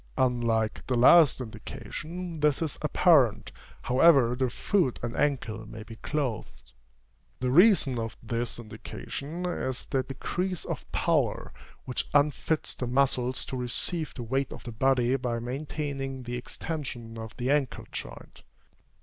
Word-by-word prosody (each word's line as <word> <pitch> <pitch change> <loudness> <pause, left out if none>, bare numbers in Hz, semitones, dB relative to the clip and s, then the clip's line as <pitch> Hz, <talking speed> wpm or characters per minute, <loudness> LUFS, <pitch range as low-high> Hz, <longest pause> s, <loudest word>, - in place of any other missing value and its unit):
Unlike 120 -4 +1
the 130 - +1
last 140 +5 +7
indication, 160 +9 -7
this 150 -2 +3
is 155 - -4
apparent, - - +4 0.3
however 130 -2 +5
the 130 0 0
foot 165 +2 +1
and 120 0 -3
ankle 115 -7 -1
may 110 0 -8
be 115 0 -11
clothed. 140 -6 -4 0.7
The 125 0 0
reason 170 - +5
of 115 -1 -4
this 115 +1 -2
indication 140 - -6
is 130 -8 -2
the 135 - 0
decrease 175 +7 -3
of - - -6
power - - 0 0.3
which 125 - -3
unfits 150 +2 +2
the 125 - -4
muscles 130 -1 +1
to - - -5
receive 130 +6 -2
the 120 - -5
weight 135 +3 -1
of - - -9
the 120 - -6
body 125 +1 +2
by 120 -2 -2
maintaining 135 +1 -4
the 120 0 -4
extension 125 -4 -5
of 110 0 -8
the 125 +1 0
ankle 145 -3 0
joint. - - -8
130 Hz, 140 wpm, -28 LUFS, 120-150 Hz, 0.7 s, last